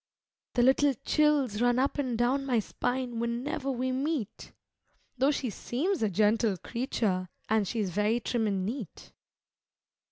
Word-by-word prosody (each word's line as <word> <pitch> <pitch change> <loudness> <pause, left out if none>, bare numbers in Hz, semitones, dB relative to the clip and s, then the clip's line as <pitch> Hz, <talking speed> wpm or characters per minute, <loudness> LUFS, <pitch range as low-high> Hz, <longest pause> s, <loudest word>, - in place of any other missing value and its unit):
The 240 - +4
little 270 +2 +4
chills 285 -8 +2
run 245 0 +3
up 275 +3 +1
and 255 -5 -1
down 255 +4 +1
my 260 -3 +1
spine 245 +2 -2
whene'er 235 +6 -2
we 255 0 -1
meet, 270 -4 -3 0.7
Though 270 +2 +4
she 275 -5 -1
seems 325 - -2
a 215 - +2
gentle 210 +1 +2
creature, 200 -5 -2 0.2
and 215 -2 +2
she's 210 -3 -1
very 210 +5 +1
trim 230 -1 -1
and 195 -2 -1
neat. 225 - -6
240 Hz, 140 wpm, -29 LUFS, 215-265 Hz, 0.7 s, The